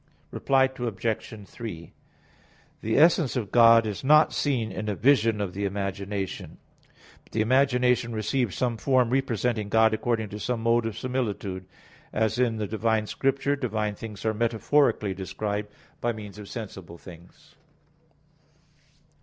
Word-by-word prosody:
Reply 135 -1 +2
Obj. 115 -4 -3
3: 95 -8 -8 0.9
The 110 +1 0
essence 160 -2 +4
of 110 -6 -3
God 115 -1 +7
is 105 +1 -4
not 150 +3 +5
seen 120 -7 0
in 105 +2 -4
a 105 - -1
vision 115 -3 +3
of 100 -3 -3
the 100 - -4
imagination; 100 0 -4 0.7
but - - -25
the 110 - +1
imagination 125 0 +2
receives 110 0 -1
some 120 -3 -1
form 125 -1 +2
representing 120 -5 0
God 110 +1 +4
according 110 -1 -1
to 105 - -7
some 120 0 -2
mode 115 0 +2
of 110 - -6
similitude; 105 -7 -3 0.4
as 110 +2 0
in 120 -3 +1
the 105 - -2
divine 110 +1 0
Scripture 135 +4 0
divine 110 -6 -2
things 105 0 -9
are 110 - +2
metaphorically 115 -1 +1
described 100 +2 -4 0.3
by 120 0 0
means 105 -1 -9
of 105 - -10
sensible 95 -7 -8
things. 85 0 -15
110 Hz, 140 wpm, -26 LUFS, 105-125 Hz, 0.9 s, God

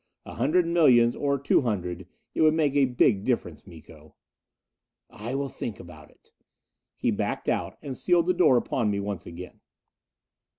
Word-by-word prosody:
A - - -9
hundred 155 +9 +1
millions, 130 -9 +4
or 140 -1 0
two 140 - +2
hundred. 90 -7 -3 0.3
It - - -1
would 155 0 +4
make 150 -4 +1
a 140 -1 +4
big 120 -5 +2
difference, 120 -4 -3
Miko." 80 -3 -15 1.0
"I 115 +5 -6
will 140 0 -2
think 115 -4 -7
about 80 -3 -13
it." - - -27 0.6
He - - 0
backed - - -3
out - - -2
and 135 -2 -5
sealed 175 +2 +2
the 180 - +2
door 170 -8 +4
upon 120 -2 -1
me 100 -1 -1
once 100 -3 -5
again. 90 +2 -10
120 Hz, 165 wpm, -26 LUFS, 95-145 Hz, 1.0 s, millions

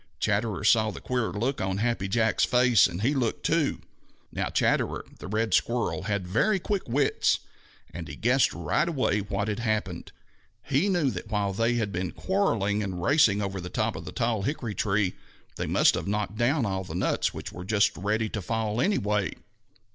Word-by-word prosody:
Chatterer 105 -2 0
saw 110 -2 +4
the - - -7
queer 125 -3 -1
look 125 +6 -2
on 95 0 -1
Happy 115 -2 0
Jack's 110 +1 +2
face, 125 -4 +5
and 90 +5 -5
he 135 +5 +3
looked 125 -5 -1
too. 165 -3 +1 0.5
Now - - -2
Chatterer - - +1
the - - -8
Red 110 +2 -1
Squirrel 115 -5 0
had 100 -3 -1
very 120 - +2
quick 195 +1 -1
wits, 140 +4 +2 0.6
and 85 -2 -6
he 70 - -7
guessed 125 - +3
right 155 +3 0
away 130 -9 +1
what 100 +1 -2
had 105 +1 -2
happened. 110 -2 -2 0.5
He 145 +9 +1
knew 170 -8 +2
that 110 - -7
while 105 -2 0
they 115 +4 +1
had 110 -4 -1
been 90 -1 -3
quarreling 110 - 0
and 95 -3 -4
racing 105 - +3
over 95 -1 -3
the 90 - -6
top - - -1
of - - -7
the - - -6
tall 115 -3 0
hickory 120 -1 -3
tree, 100 -2 0 0.4
they - - -3
must - - +4
have - - -3
knocked 105 +1 -2
down 120 +4 +1
all 95 -2 -2
the 85 -3 -7
nuts, 90 - 0
which - - -7
were 90 - -7
just 105 +2 +2
ready 105 +6 0
to 105 - -4
fall 110 +3 -1
anyway. 105 - +1
110 Hz, 190 wpm, -27 LUFS, 100-125 Hz, 0.6 s, face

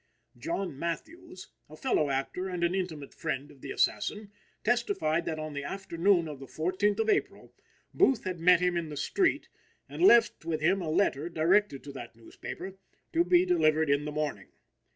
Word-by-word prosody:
John 195 - -4
Matthews, 190 - -6 0.2
a 155 - -11
fellow 155 - +1
actor 140 +8 -2
and 180 -2 -3
an 170 +1 +2
intimate 170 -7 -4
friend 145 -2 -4
of 140 -3 -19
the 140 - -8
assassin, 210 +7 -1 0.3
testified 200 -9 0
that 160 -2 -3
on 155 -1 -5
the 140 0 -4
afternoon 185 0 +1
of 150 -3 -7
the 135 - -10
14th 185 - 0
of 220 - +1
April - - -1 0.4
Booth 265 -5 +3
had 185 -3 -4
met 180 +1 +5
him 180 0 +1
in 170 -2 -2
the 150 - -7
street 375 - +1 0.4
and - - -7
left 235 - +5
with 160 -1 -2
him 185 +5 +2
a 165 - -3
letter 155 -2 +1
directed 170 -1 +2
to 145 - -8
that 120 -4 -9
newspaper, 185 +11 -9 0.3
to 335 +1 +4
be 355 0 +4
delivered 160 - +3
in 140 +1 +1
the 150 - -4
morning. 150 0 -3
170 Hz, 180 wpm, -29 LUFS, 150-200 Hz, 0.4 s, met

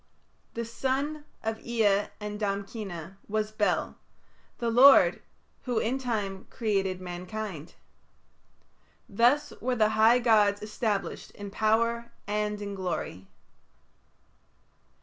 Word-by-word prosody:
The 235 0 -2
son 275 +6 -2 0.2
of 220 0 -2
Ea 210 -4 +2
and 210 0 -5
Damkina 195 -3 -4
was 215 0 -1
Bel, 215 -1 0 0.6
the 235 -1 -1
lord, 265 +4 +7 0.4
who 245 -3 -1
in 245 +5 0
time 205 -7 -3
created 195 -5 -1
mankind. 180 -1 -6 1.3
Thus 240 +8 +2
were 250 +1 0
the 215 -2 +3
high 220 +2 +5
gods 210 -4 +3
established 210 -1 -2
in 205 -1 -8
power 230 +2 +1 0.2
and 210 0 -1
in 200 0 -5
glory. 180 - -4
215 Hz, 105 wpm, -28 LUFS, 200-235 Hz, 1.3 s, lord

